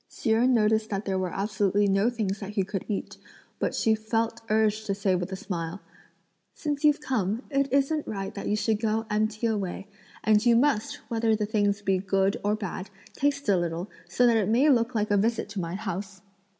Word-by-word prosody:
Hsi 230 - -2
Jen 235 +4 +4
noticed 220 0 +2
that 200 0 -3
there 190 -1 0
were 185 -2 -2
absolutely 205 0 +1
no 195 +4 +3
things 215 -5 -2
that 195 - -6
he 200 -2 +1
could 195 +1 -4
eat, 210 - -4 0.4
but - - -1
she 220 - +3
felt 225 +1 -1
urged 215 0 +1
to 200 - 0
say 195 -1 +1
with 180 +1 -2
a - - -2
smile: 175 -1 -4 0.8
"Since 295 -1 -3
you've 295 -1 +4
come, 225 -4 -1
it 275 -1 +1
isn't 280 +3 +1
right 195 -2 -4
that 200 - -5
you 210 - +1
should 215 0 0
go 220 0 0
empty 215 +1 0
away; 200 -4 -2 0.4
and 215 -1 +4
you 240 -1 +5
must, 240 -3 +2
whether 225 -1 +2
the 210 -1 -1
things 205 -1 0
be 195 -2 +2
good 195 +1 +1
or 205 +1 +2
bad, 195 -2 -5 0.2
taste 285 -1 -1
a 200 - +4
little, 175 +2 -2 0.2
so 245 - +3
that 235 -2 +5
it 210 -2 +1
may 255 +7 +4
look 235 -1 +2
like 210 -1 0
a 205 - +4
visit 225 +3 +1
to 205 -1 -5
my 170 0 -3
house!" 195 -1 -5
215 Hz, 210 wpm, -27 LUFS, 195-230 Hz, 0.8 s, you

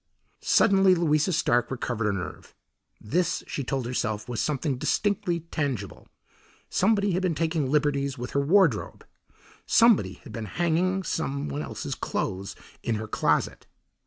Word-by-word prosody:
Suddenly 195 -1 +4
Louisa 155 0 +2
Stark 120 -8 +2
recovered 120 -3 -3
her 105 - +1
nerve. 95 -1 -7 0.4
This, 170 +10 -1
she 140 - -4
told 130 0 -2
herself, 110 -3 -2
was 120 -2 -2
something 145 -3 -1
distinctly 200 0 0
tangible. 130 -11 -3 0.6
Somebody 200 0 +2
had 180 +1 0
been 180 -4 0
taking 160 -3 0
liberties 140 -2 +1
with 125 0 -6
her 140 - +1
wardrobe. 155 - +2 0.6
Somebody 230 -2 +4
had 115 - -11
been 115 -1 -4
hanging 175 - 0
some 140 - -2
one 70 +1 -3
else's 75 - -5
clothes 95 +1 -3 0.3
in 115 - -1
her 110 +1 -4
closet. 75 -7 0
145 Hz, 140 wpm, -26 LUFS, 120-175 Hz, 0.6 s, Suddenly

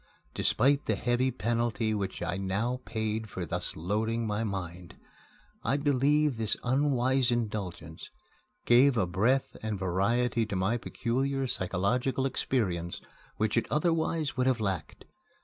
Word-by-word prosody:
Despite 140 +4 +2
the 110 - +2
heavy 120 +4 +1
penalty 115 0 -1
which 100 -2 -3
I - - -2
now 105 +7 -1
paid 110 -1 -2
for 90 -2 -4
thus - - -3
loading 110 +7 -1
my 105 +1 -1
mind, 90 -4 -5 0.7
I 135 - +1
believe 145 0 +2
this 110 -2 +3
unwise 130 -1 +2
indulgence 100 -8 -4 0.6
gave 125 +2 +5
a 105 - +3
breadth 110 +10 +1
and 110 -2 -2
variety 105 +6 +1
to 100 - -3
my 95 +6 +1
peculiar 135 +3 -1
psychological 125 +6 0
experience 95 -10 -1 0.4
which 110 0 0
it 115 - +1
otherwise 160 -1 0
would 130 0 +1
have 130 -2 +2
lacked. 95 -8 -3
115 Hz, 130 wpm, -29 LUFS, 100-130 Hz, 0.7 s, gave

